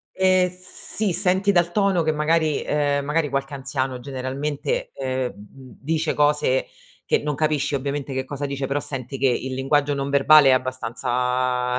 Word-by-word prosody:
Ehm, 185 Hz, -1 st, +3 dB
sì, 185 Hz, +2 st, -4 dB
senti 190 Hz, +2 st, +2 dB
dal 175 Hz, -1 st, +2 dB
tono 195 Hz, -4 st, +2 dB
che 155 Hz, -, +1 dB
magari, 155 Hz, 0 st, +1 dB
ehm, 145 Hz, -1 st, 0 dB
magari 150 Hz, 0 st, 0 dB
qualche 135 Hz, +1 st, -2 dB
anziano 135 Hz, -2 st, -3 dB
generalmente, 140 Hz, -, -3 dB
ehm, 130 Hz, -1 st, -2 dB
m 115 Hz, +6 st, -14 dB
m -, -, -15 dB
dice 160 Hz, +2 st, 0 dB
cose 145 Hz, -3 st, +2 dB, 0.4 s
che -, -, +2 dB
non 150 Hz, -1 st, -2 dB
capisci 150 Hz, -1 st, 0 dB
ovviamente 140 Hz, +1 st, -3 dB
che 130 Hz, 0 st, -2 dB
cosa 145 Hz, +1 st, -4 dB
dice, 140 Hz, -1 st, -3 dB
però 140 Hz, +2 st, -1 dB
senti 135 Hz, -1 st, -6 dB
che 135 Hz, 0 st, +2 dB
il 130 Hz, +1 st, -1 dB
linguaggio 140 Hz, +2 st, +1 dB
non 140 Hz, 0 st, -3 dB
verbale 140 Hz, 0 st, +6 dB
è -, -, +7 dB
abbastanza 125 Hz, 0 st, 0 dB
140 Hz, 170 wpm, -23 LUFS, 130-155 Hz, 0.4 s, è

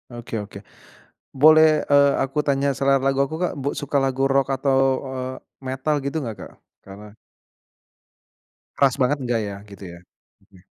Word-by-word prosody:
Oke 120 Hz, -2 st, -6 dB
oke, 100 Hz, -1 st, -10 dB, 0.8 s
boleh, 155 Hz, +2 st, +5 dB
eee, 140 Hz, 0 st, +4 dB
aku 135 Hz, +3 st, -1 dB
tanya 140 Hz, -1 st, 0 dB
selera 135 Hz, +1 st, +2 dB
lagu 135 Hz, 0 st, +1 dB
aku, 155 Hz, -, -6 dB
Kak, 180 Hz, -, -1 dB
bu 140 Hz, -, -1 dB
suka 145 Hz, 0 st, -2 dB
lagu 135 Hz, 0 st, 0 dB
rock 135 Hz, 0 st, +1 dB
atau, 135 Hz, 0 st, +1 dB, 0.3 s
eee, 130 Hz, 0 st, -5 dB, 0.3 s
metal 135 Hz, +4 st, -1 dB
gitu 140 Hz, +3 st, -3 dB
nggak, 115 Hz, -3 st, -5 dB
Kak? -, -, -10 dB, 0.3 s
Karena 100 Hz, +1 st, -12 dB, 1.6 s
keras 135 Hz, -2 st, +3 dB
banget 135 Hz, +4 st, +2 dB
nggak 120 Hz, -2 st, -1 dB
ya, 100 Hz, -, -6 dB
gitu 100 Hz, 0 st, -12 dB
ya? -, -, -12 dB, 0.5 s
Mhm. 95 Hz, -2 st, -21 dB
135 Hz, 155 wpm, -22 LUFS, 120-140 Hz, 1.6 s, boleh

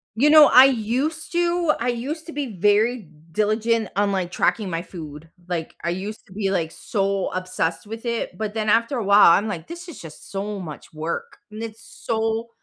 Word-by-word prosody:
You 290 Hz, +6 st, +4 dB
know, 305 Hz, -1 st, +9 dB
I 255 Hz, +1 st, +9 dB
used 270 Hz, +6 st, 0 dB
to 345 Hz, -1 st, +2 dB
I -, -, -2 dB
used 275 Hz, +8 st, -3 dB
to 330 Hz, -, -8 dB
be 270 Hz, -9 st, -4 dB
very 210 Hz, +1 st, +2 dB, 0.2 s
diligent 215 Hz, +3 st, +1 dB
on, 200 Hz, +1 st, +1 dB
like, 180 Hz, -2 st, -2 dB
tracking 210 Hz, +1 st, +1 dB
my 165 Hz, -1 st, -3 dB
food, 160 Hz, -3 st, -10 dB, 0.2 s
like, 165 Hz, -2 st, -3 dB
I 170 Hz, -, 0 dB
used 200 Hz, +5 st, -5 dB
to 190 Hz, -, -18 dB
be, 195 Hz, -1 st, -1 dB
like, 165 Hz, -4 st, -1 dB
so 195 Hz, -2 st, -1 dB
obsessed 185 Hz, -1 st, -2 dB
with 225 Hz, +3 st, -8 dB
it, 235 Hz, -1 st, -3 dB
but 215 Hz, -1 st, -3 dB
then 215 Hz, -1 st, -2 dB
after 230 Hz, +5 st, +2 dB
a 225 Hz, -, -2 dB
while, 200 Hz, -3 st, +7 dB
I'm 200 Hz, +5 st, +4 dB
like, 175 Hz, -6 st, -5 dB
"This 345 Hz, +1 st, -8 dB
is 325 Hz, -, -9 dB
just 160 Hz, -2 st, -12 dB
so 200 Hz, +1 st, -3 dB
much 160 Hz, -5 st, -9 dB
work," 160 Hz, +2 st, -5 dB
and 215 Hz, +1 st, -7 dB
it's 225 Hz, 0 st, -7 dB, 0.2 s
so 225 Hz, 0 st, -1 dB
215 Hz, 200 wpm, -23 LUFS, 185-235 Hz, 0.2 s, know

